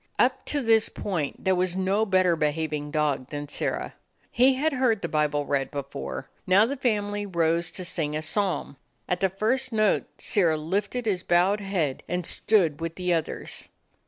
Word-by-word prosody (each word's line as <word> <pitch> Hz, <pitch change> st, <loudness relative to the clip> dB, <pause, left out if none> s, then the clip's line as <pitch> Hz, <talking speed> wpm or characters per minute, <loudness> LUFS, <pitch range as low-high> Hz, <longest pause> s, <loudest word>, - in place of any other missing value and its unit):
Up -, -, +2 dB
to 290 Hz, -2 st, -1 dB
this 225 Hz, -1 st, +4 dB
point 170 Hz, -8 st, -3 dB
there 190 Hz, -, +3 dB
was 180 Hz, 0 st, 0 dB
no 195 Hz, +4 st, +1 dB
better 185 Hz, -3 st, +3 dB
behaving 150 Hz, -1 st, -1 dB
dog 145 Hz, -3 st, 0 dB
than 145 Hz, 0 st, -5 dB
Sirrah. -, -, -3 dB, 0.4 s
He 260 Hz, +2 st, +4 dB
had 305 Hz, +3 st, 0 dB
heard 250 Hz, -5 st, +1 dB
the -, -, 0 dB
Bible 150 Hz, -1 st, 0 dB
read 135 Hz, -2 st, 0 dB
before. 140 Hz, -, -5 dB, 0.2 s
Now 190 Hz, +4 st, +6 dB
the 275 Hz, +5 st, -2 dB
family 205 Hz, -5 st, -1 dB
rose 170 Hz, -1 st, +1 dB
to 185 Hz, -, -5 dB
sing 150 Hz, -4 st, -2 dB
a 155 Hz, -, -2 dB
psalm. 185 Hz, -3 st, -1 dB, 0.3 s
At 180 Hz, -, 0 dB
the 190 Hz, -, +2 dB
first 235 Hz, +7 st, 0 dB
note 215 Hz, -2 st, +2 dB
Sirrah 170 Hz, -7 st, +1 dB
lifted 200 Hz, +9 st, -2 dB
his 195 Hz, -5 st, 0 dB
bowed 180 Hz, +5 st, +3 dB
head, 180 Hz, -9 st, -1 dB
and 180 Hz, 0 st, -2 dB
stood 170 Hz, -9 st, +2 dB
with 165 Hz, 0 st, -3 dB
the 180 Hz, -1 st, 0 dB
others. 165 Hz, -2 st, -4 dB
180 Hz, 175 wpm, -26 LUFS, 155-210 Hz, 0.4 s, Now